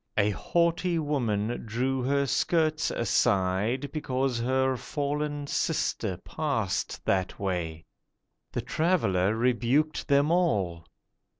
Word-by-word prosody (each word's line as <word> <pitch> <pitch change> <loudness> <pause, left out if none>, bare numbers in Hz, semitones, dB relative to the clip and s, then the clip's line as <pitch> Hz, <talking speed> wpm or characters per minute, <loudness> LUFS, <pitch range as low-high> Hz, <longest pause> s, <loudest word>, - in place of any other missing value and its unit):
A 105 0 +3
haughty 170 - +1
woman 120 -8 -1
drew 125 +4 -1
her 140 +2 +1
skirts 155 +3 +1
aside 105 +5 +1
Because 135 -4 -1
her 130 +2 +1
fallen 145 +2 -3
sister 115 - -1
passed 125 - -2
that 95 -1 0
way. 85 -4 -3 0.7
The - - -2
Traveller 110 - +1
rebuked 125 +6 +1
them 140 +2 +3
all. 95 - +1
130 Hz, 100 wpm, -28 LUFS, 105-150 Hz, 0.7 s, A